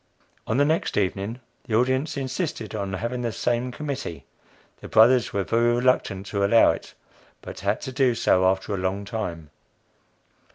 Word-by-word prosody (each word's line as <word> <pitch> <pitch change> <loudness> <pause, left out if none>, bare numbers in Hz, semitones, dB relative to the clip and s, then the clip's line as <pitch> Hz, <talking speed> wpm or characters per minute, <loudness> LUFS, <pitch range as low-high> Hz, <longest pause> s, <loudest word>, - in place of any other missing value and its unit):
On 110 - 0
the 145 - +4
next 160 +3 0
evening, 100 +4 -1 0.2
the 110 - -1
audience 130 +5 +1
insisted 130 - -3
on 100 -2 -3
having 120 +6 -3
the 120 -1 -1
same 120 +3 -1
committee; 140 - -5 0.5
the - - -9
Brothers 115 +1 +5
were 100 - -1
very 120 +3 +2
reluctant 120 -6 +1
to 100 0 -2
allow 115 +3 +5
it, - - -8 0.5
but - - -8
had 100 +3 -1
to 130 - -5
do 130 -2 +2
so 95 -4 +3
after 95 +2 0
a - - -1
long 95 +2 -2
time. 85 -9 -5
115 Hz, 165 wpm, -24 LUFS, 100-130 Hz, 0.5 s, Brothers